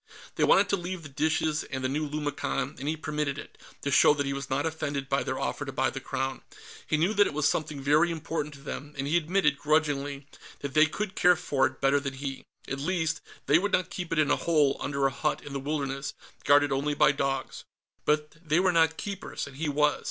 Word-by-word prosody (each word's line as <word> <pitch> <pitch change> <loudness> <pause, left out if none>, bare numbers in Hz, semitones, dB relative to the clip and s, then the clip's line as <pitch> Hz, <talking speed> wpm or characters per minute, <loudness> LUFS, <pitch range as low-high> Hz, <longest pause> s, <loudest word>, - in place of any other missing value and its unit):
They - - 0
wanted 200 +1 +5
to 200 - +2
leave 175 -1 -5
the 155 - -9
dishes 155 +2 0
and 130 -1 -5
the - - +2
new 150 +3 -2
lumicon, 145 -1 -2
and 140 - -5
he 160 - -1
permitted 150 -2 -2
it, - - -9 0.3
to 140 - -1
show 145 - +6
that 145 -1 -1
he 140 - -1
was 140 0 -5
not 135 +3 0
offended 155 -4 -3
by 135 0 +1
their - - -3
offer - - -2
to - - -5
buy - - 0
the - - -5
Crown. 135 0 -3 0.5
He 155 - +2
knew 175 +7 +2
that 205 -1 +5
it - - -6
was 150 -1 +2
something 150 -2 -1
very 150 +5 +3
important 160 -2 -3
to 140 - -14
them, 145 +1 -7
and 135 - -2
he 150 +4 0
admitted, 160 -4 +2
grudgingly, 145 -2 0 0.4
that 140 -1 -4
they 155 +1 +6
could 200 +5 -4
care 180 -1 +5
for 145 -5 +1
it - - -11
better 135 +1 +4
than 140 -1 -4
he. 135 0 -5 0.2
At 135 - -3
least, 160 +1 -1 0.2
they 150 +3 +5
would 205 +2 -2
not 180 - +1
keep 175 -2 -5
it 165 - 0
in 150 -2 +3
a - - +5
hole 150 -5 +2
under 140 -1 -1
a 135 - +3
hut 150 - -1
in 145 - -8
the 140 - -2
wilderness, 140 -1 -3 0.3
guarded 145 0 +5
only 145 +2 0
by 140 - +5
dogs. 135 -2 -2 0.4
But 150 +1 0
they 155 +1 +2
were 185 0 +3
not 160 -1 +3
Keepers, 195 -2 -5
and 140 -1 -11
he 155 0 -1
was. 150 +1 +2
150 Hz, 235 wpm, -28 LUFS, 140-160 Hz, 0.5 s, show